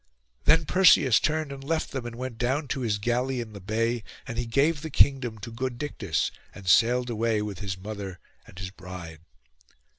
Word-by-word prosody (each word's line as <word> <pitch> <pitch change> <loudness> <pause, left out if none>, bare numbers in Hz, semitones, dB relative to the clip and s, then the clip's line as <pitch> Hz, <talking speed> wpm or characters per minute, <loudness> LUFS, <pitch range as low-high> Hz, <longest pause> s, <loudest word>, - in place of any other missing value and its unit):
Then 160 +1 +5
Perseus 155 - +6
turned 155 -2 0
and 135 -1 -8
left 160 +3 -1
them, 130 -3 -4
and 120 - -7
went 125 -2 -6
down 135 +5 0
to 140 - -1
his 110 -5 0
galley 125 +4 0
in 115 -2 -6
the 100 - -8
bay; 115 +3 0 0.2
and 115 0 -4
he 120 - -2
gave 145 +6 +2
the 160 - -5
kingdom 130 -5 +3
to 115 +3 -8
good 125 +1 -3
Dictys, 110 - -1 0.2
and 100 -2 -11
sailed 120 +5 +4
away 115 -1 +1
with 100 -4 -5
his 95 -1 -4
mother 100 -1 -6 0.3
and - - -15
his 95 0 -5
bride. 90 -4 -9
120 Hz, 190 wpm, -27 LUFS, 105-135 Hz, 0.3 s, Perseus